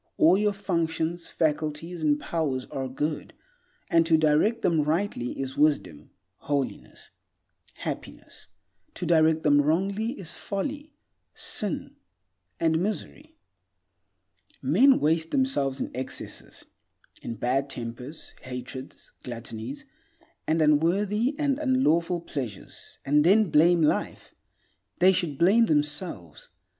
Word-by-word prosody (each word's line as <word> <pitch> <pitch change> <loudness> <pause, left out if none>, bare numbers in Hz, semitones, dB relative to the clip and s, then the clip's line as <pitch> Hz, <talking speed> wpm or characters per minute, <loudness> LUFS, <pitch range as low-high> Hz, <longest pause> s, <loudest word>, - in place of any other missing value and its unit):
All 165 +4 +6
your 210 +1 +2
functions, 170 -3 -2
faculties, 155 +2 -2
and 150 -1 +2
powers 145 -7 -2
are 135 -1 -3
good, 150 +4 -4 0.5
and 165 0 +4
to 160 -1 +5
direct 155 +9 +2
them 165 -3 +3
rightly 155 -4 -1
is 135 -1 -4
wisdom, 145 - 0 0.3
holiness, 140 -2 -4 0.6
happiness; - - -7 0.5
to - - -4
direct 160 -1 +3
them 145 -1 +5
wrongly 195 - 0
is 190 - -7
folly, 285 +10 -5 0.4
sin, 205 -6 -3 0.6
and 160 -1 +2
misery. 290 - -5 1.2
Men 270 +1 +4
waste 160 +2 +1
themselves 145 - +1
in - - -3
excesses; 130 +1 -6 0.6
in 115 - -5
bad 130 +5 0
tempers, 125 +5 -6
hatreds, 130 +1 -8
gluttonies, 120 +1 -7 0.6
and 160 0 +2
unworthy 200 - +2
and 285 -2 0
unlawful 180 - +2
pleasures, 125 - -7
and 150 +2 +4
then 195 +1 +4
blame 170 +2 +5
life. 150 - -1 0.6
They 185 +2 +6
should 165 -6 -2
blame 210 +8 +5
themselves. 150 - -2
160 Hz, 110 wpm, -26 LUFS, 140-190 Hz, 1.2 s, All